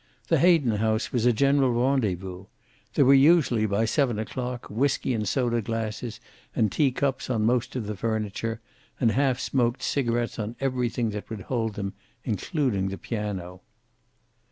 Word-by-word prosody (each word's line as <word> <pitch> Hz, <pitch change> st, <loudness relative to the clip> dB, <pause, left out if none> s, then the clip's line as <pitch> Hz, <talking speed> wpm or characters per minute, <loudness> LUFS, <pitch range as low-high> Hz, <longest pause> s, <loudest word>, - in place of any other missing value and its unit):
The -, -, +4 dB
Hayden 160 Hz, -11 st, +4 dB
house 110 Hz, +1 st, 0 dB
was 120 Hz, -1 st, +1 dB
a -, -, +6 dB
general 135 Hz, +1 st, +3 dB
rendezvous. 100 Hz, -8 st, 0 dB, 0.5 s
There 140 Hz, -, +5 dB
were 135 Hz, -, +7 dB
usually, 135 Hz, -6 st, +5 dB
by 100 Hz, +2 st, +1 dB
seven 125 Hz, -2 st, +1 dB
o'clock, 125 Hz, +2 st, -4 dB
whiskey 130 Hz, +3 st, 0 dB
and 105 Hz, -3 st, -1 dB
soda 120 Hz, -3 st, +1 dB
glasses 115 Hz, +1 st, -4 dB, 0.4 s
and 105 Hz, -3 st, +2 dB
tea 140 Hz, -4 st, +2 dB
cups 135 Hz, 0 st, -1 dB
on 110 Hz, -4 st, +1 dB
most 120 Hz, +2 st, +1 dB
of 120 Hz, -4 st, -2 dB
the 105 Hz, 0 st, -4 dB
furniture, 110 Hz, +2 st, -2 dB, 0.4 s
and 115 Hz, -3 st, +3 dB
half 130 Hz, +1 st, +1 dB
smoked 125 Hz, -3 st, 0 dB
cigarets 120 Hz, -4 st, -1 dB
on 110 Hz, +2 st, -4 dB
everything 125 Hz, -3 st, -1 dB
that 105 Hz, 0 st, -6 dB
would 110 Hz, -3 st, -6 dB
hold 115 Hz, 0 st, -2 dB
them, 100 Hz, -1 st, -4 dB, 0.3 s
including 115 Hz, -, -1 dB
the 95 Hz, 0 st, -4 dB
piano. 95 Hz, -5 st, -5 dB
115 Hz, 155 wpm, -26 LUFS, 105-130 Hz, 0.5 s, were